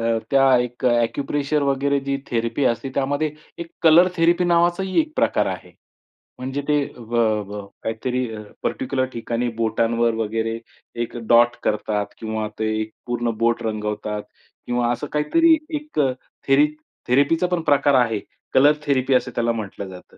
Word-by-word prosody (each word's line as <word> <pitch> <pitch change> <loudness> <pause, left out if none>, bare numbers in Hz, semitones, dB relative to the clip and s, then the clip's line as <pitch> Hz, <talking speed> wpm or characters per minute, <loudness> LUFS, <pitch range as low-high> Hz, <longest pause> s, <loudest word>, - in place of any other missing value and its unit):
अ, - - 0
त्या 135 -1 +5
एक 125 +1 -3
एक्यूप्रेशर 140 +5 +1
वगैरे 140 0 +1
जी 140 0 -2
थेरपी 115 +3 -1
असते, 125 +2 0
त्यामध्ये 145 +3 0 0.3
एक 170 -1 -7
कलर 170 +2 +7
थेरपी 170 +2 +3
नावाचाही 175 - +2
एक 310 0 -8
प्रकार - - +2
आहे. - - -6 0.7
म्हणजे 135 +2 -3
ते 150 -1 +2
ब 115 0 -11 0.3
ब 105 0 -7 0.2
काहीतरी 125 +3 -2
अ, 105 - -7 0.2
पर्टिक्युलर 130 0 -1
ठिकाणी 115 +1 -2
बोटांवर 115 +1 +1
वगैरे 115 +1 -2 0.4
एक 120 - -4
डॉट 120 +1 +5
करतात 105 -1 0
किंवा 110 -1 -3
ते 110 - 0
एक 110 0 -5 0.2
पूर्ण 120 -1 -1
बोट 115 0 +2
रंगवतात 105 -1 -3 0.4
किंवा 120 0 0
असं 135 +4 -3
काहीतरी 320 - +4 0.2
एक 300 - -4 0.5
थेर 135 +2 +5 0.4
थेरपीचापण 165 +7 +2
प्रकार 145 -1 +3
आहे. 115 -2 -2 0.3
कलर 145 +3 +6
थेरपी 135 -2 +1
असं 125 - +2
त्याला 120 0 +1
म्हटलं 105 -3 -5
जातं. 90 -1 -13
125 Hz, 145 wpm, -22 LUFS, 115-145 Hz, 0.7 s, कलर